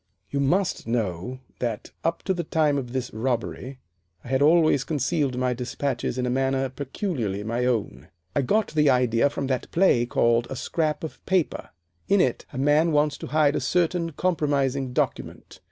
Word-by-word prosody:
You 140 - -1
must 170 +5 +1
know 115 +2 -2 0.2
that 115 -4 -3
up 165 +1 -1
to 190 - 0
the 175 -1 -3
time 150 -3 +1
of 125 -3 -7
this 130 -1 -3
robbery 125 +3 -3 0.5
I - - -10
had 130 +1 +1
always 155 -2 +4
concealed 145 -2 -1
my 125 0 +1
despatches 125 +1 -3
in 125 - 0
a - - 0
manner 135 +1 0
peculiarly 130 - -3
my 115 +3 -1
own. 115 -8 -2 0.3
I 145 - +3
got 210 - +1
the 150 -2 +3
idea 125 0 +3
from 140 - -4
that 130 -1 -2
play 160 -10 +3
called 120 0 +2
'A - - -4
Scrap 155 +4 -1
of 160 - -7
Paper.' 185 -4 0 0.4
In 200 0 +4
it - - 0
a 140 - -8
man 145 +4 +3
wants 150 -1 +2
to - - -6
hide 150 +1 +3
a - - +1
certain 170 -1 0
compromising 140 -6 0
document. - - -3
135 Hz, 175 wpm, -25 LUFS, 125-155 Hz, 0.5 s, always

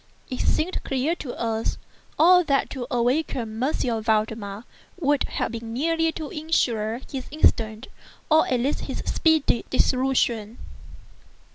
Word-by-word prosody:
It 255 - -3
seemed 355 +4 0
clear 270 +4 0
to 255 -6 -6
us 225 -1 -1 0.4
all 360 +2 +6
that 275 -2 +1
to 250 -3 -5
awaken 245 -3 -1
M. 250 -5 0
Valdemar 215 -1 -1 0.4
would 290 -4 +1 0.2
be 230 - -4
merely 320 +9 0
to 310 -3 -6
insure 240 -8 0
his 265 -2 -5
instant, 225 -6 +1 0.4
or 315 0 +4
at 250 - +1
least 275 +4 0
his - - -4
speedy, 315 -7 +2
dissolution. 250 -4 +1
255 Hz, 125 wpm, -24 LUFS, 225-305 Hz, 0.4 s, all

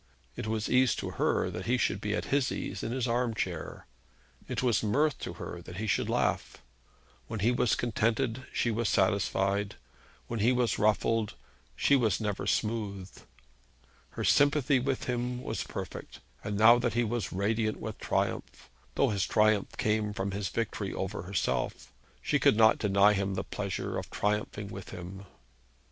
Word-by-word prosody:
It - - -5
was 110 -1 -1
ease 130 -1 +4
to - - -4
her, - - 0
that - - -6
he 125 +2 +3
should 100 -5 0
be 105 0 -1
at - - -2
his 140 -2 +2
ease - - -4
in 115 - -3
his 130 0 -1
arm 120 -1 0
chair. 90 -7 -4 0.6
It - - -2
was 120 -6 +3
mirth 145 +8 +1
to - - -5
her, 85 - -7
that 90 +1 -10
he 110 - -2
should 105 - 0
laugh. - - 0 0.7
When 110 -3 -4
he 115 +4 +4
was 120 -2 +2
contented 120 +2 0
she 120 - 0
was 115 0 0
satisfied. 100 +1 +1 0.5
When 115 - -4
he 115 +5 +4
was 120 -3 +1
ruffled 110 +1 +2 0.4
she 140 - +4
was 115 -7 +2
never 105 -3 -2
smooth. 105 -4 -1 1.1
Her - - -2
sympathy 145 -1 +4
with 130 +1 -1
him 125 0 -2
was - - -3
perfect; - - -7 0.2
and 105 -1 -3
now 115 +3 +7
that 120 -2 -1
he 120 - +3
was 115 -2 -2
radiant 110 +3 0
with - - -6
triumph, - - -2 0.2
though - - +3
his 100 -2 0
triumph 110 -2 +2
came 105 -1 0
from 100 -1 -2
his 100 -1 -2
victory 115 -2 -2
over - - -3
herself, 90 +1 -2 0.3
she - - +2
could 105 - +4
not 110 0 +6
deny 100 0 +4
him 100 -1 -1
the 95 - -2
pleasure 100 -2 -3
of - - -8
triumphing 105 0 -2
with 95 -1 -8
him. 95 +3 -8
110 Hz, 170 wpm, -30 LUFS, 100-120 Hz, 1.1 s, now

